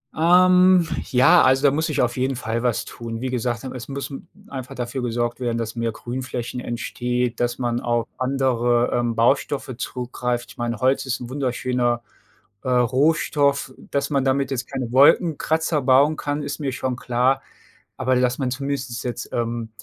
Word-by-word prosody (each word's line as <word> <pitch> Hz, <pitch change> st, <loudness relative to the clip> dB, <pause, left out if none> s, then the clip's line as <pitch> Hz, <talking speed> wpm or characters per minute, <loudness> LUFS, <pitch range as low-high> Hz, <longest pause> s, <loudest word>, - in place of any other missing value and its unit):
Ähm, 180 Hz, +1 st, +5 dB, 0.2 s
ja, 130 Hz, +8 st, +6 dB
also, 130 Hz, +2 st, +4 dB
da -, -, +4 dB
muss 160 Hz, +3 st, 0 dB
sich 155 Hz, -, 0 dB
auf 120 Hz, -1 st, 0 dB
jeden 130 Hz, +1 st, 0 dB
Fall 115 Hz, 0 st, -3 dB
was 120 Hz, -3 st, 0 dB
tun. 115 Hz, -1 st, -7 dB
Wie 130 Hz, -, -2 dB
gesagt, 120 Hz, 0 st, -2 dB
hm, 130 Hz, -, -6 dB
es 125 Hz, -1 st, -7 dB
muss 140 Hz, 0 st, -5 dB, 0.3 s
einfach 130 Hz, -2 st, -7 dB
dafür 125 Hz, +1 st, -4 dB
gesorgt 120 Hz, 0 st, -1 dB
werden, 120 Hz, -2 st, -1 dB
dass 115 Hz, 0 st, -4 dB
mehr 115 Hz, -1 st, -1 dB
Grünflächen 125 Hz, +1 st, -5 dB
entsteht, 120 Hz, 0 st, -2 dB
dass 120 Hz, +1 st, -1 dB
man 120 Hz, -1 st, -1 dB
auf 120 Hz, -1 st, 0 dB
andere, 125 Hz, -2 st, +1 dB
ähm, 120 Hz, -1 st, 0 dB
Baustoffe 130 Hz, +2 st, +1 dB
zurückgreift, 125 Hz, -1 st, -3 dB
ich -, -, -16 dB
meine, 120 Hz, 0 st, -2 dB
Holz 130 Hz, +1 st, +2 dB
ist 130 Hz, -, -2 dB
'n 120 Hz, -1 st, -7 dB
wunderschöner, 125 Hz, -2 st, -1 dB, 0.6 s
äh, 130 Hz, -, -3 dB
Rohstoff, 140 Hz, +3 st, +2 dB, 0.2 s
dass 140 Hz, 0 st, 0 dB
man 140 Hz, -2 st, +1 dB
damit 135 Hz, 0 st, +1 dB
jetzt 130 Hz, -1 st, -3 dB
keine 130 Hz, -3 st, -3 dB
Wolkenkratzer 155 Hz, +2 st, +3 dB
bauen 135 Hz, +4 st, +4 dB
kann, 145 Hz, 0 st, -2 dB
ist 145 Hz, -, -4 dB
mir 140 Hz, -3 st, -2 dB
schon 130 Hz, 0 st, -2 dB
klar, 125 Hz, +2 st, +1 dB, 0.6 s
aber 130 Hz, 0 st, +1 dB
dass 125 Hz, 0 st, +1 dB
man 130 Hz, -2 st, 0 dB
zumindest 135 Hz, -2 st, -3 dB
jetzt, 120 Hz, -1 st, -5 dB
ähm, 115 Hz, -1 st, -2 dB
125 Hz, 175 wpm, -22 LUFS, 120-140 Hz, 0.6 s, ja